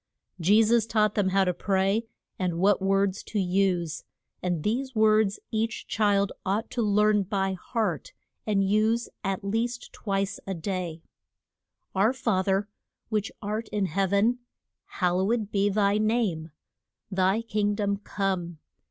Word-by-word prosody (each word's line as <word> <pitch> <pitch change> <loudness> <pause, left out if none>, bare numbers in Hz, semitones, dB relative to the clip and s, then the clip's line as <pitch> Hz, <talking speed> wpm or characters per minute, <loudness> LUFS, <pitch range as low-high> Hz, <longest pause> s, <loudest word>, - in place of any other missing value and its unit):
Je 205 +6 +5
sus 225 0 +3
taught 215 -2 +2
them 200 -3 +1
how 195 +1 +3
to 180 - +1
pray, 195 +4 0 0.3
and 180 -3 -1
what 195 +2 +3
words 195 0 +1
to 215 - -3
use; 180 -4 0 0.4
and 175 -4 -1
these 255 +4 -1
words 215 -2 +3
each 220 0 -2
child 200 -2 +2
ought 200 +4 -1
to 240 - -1
learn 210 0 +3
by 195 -1 -1
heart 190 - -2 0.4
and 195 -2 +2
use 220 +3 +2
at 195 -1 -2
least 230 +4 -2
twice 195 -2 -2
a 195 - -2
day: 170 -2 -4 0.9
"Our 205 +6 +3
Fa 230 -8 0
ther 195 +1 +1 0.4
which 215 -1 -1
art 215 +3 -3
in 205 -2 -1
heav 190 +2 0
en, 220 +5 +3 0.5
Hal 180 -1 0
low 190 +2 +1
ed 225 -3 0
be 200 0 +2
thy 205 0 +2
name. 215 -8 0 0.6
Thy 190 +4 +2
King 210 -2 0
dom 200 -1 0
come. 190 -4 -3
200 Hz, 150 wpm, -27 LUFS, 190-215 Hz, 0.9 s, Je